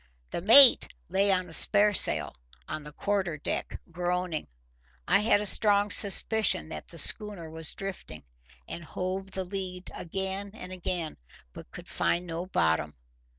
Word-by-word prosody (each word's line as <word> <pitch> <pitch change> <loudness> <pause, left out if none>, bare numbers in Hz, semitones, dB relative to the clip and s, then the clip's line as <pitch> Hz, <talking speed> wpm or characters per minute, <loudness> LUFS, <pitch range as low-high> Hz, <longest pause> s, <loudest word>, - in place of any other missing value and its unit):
The - - -5
mate 245 +7 +7 0.2
lay 195 +2 +1
on 185 -1 -1
a 165 - -12
sparesail 205 +3 +4 0.3
on 155 - -7
the 150 - -11
quarter 190 -1 -4
deck, 145 - -6
groaning. 180 -2 -4 0.6
I 195 +3 +2
had 210 0 +1
a - - -5
strong 205 0 +1
suspicion 200 -3 +3
that - - -9
the 170 - -8
schooner 175 0 +2
was 160 -1 +1
drifting, 185 - -9 0.4
and 170 - -9
hove 185 +3 -6
the 190 0 -5
lead 185 -1 -7
again 190 +3 -5
and 185 -4 -11
again, 175 -3 -5 0.4
but - - -13
could - - -13
find 175 +1 -2
no 170 +1 -7
bottom. 80 - -2
185 Hz, 150 wpm, -26 LUFS, 170-200 Hz, 0.6 s, mate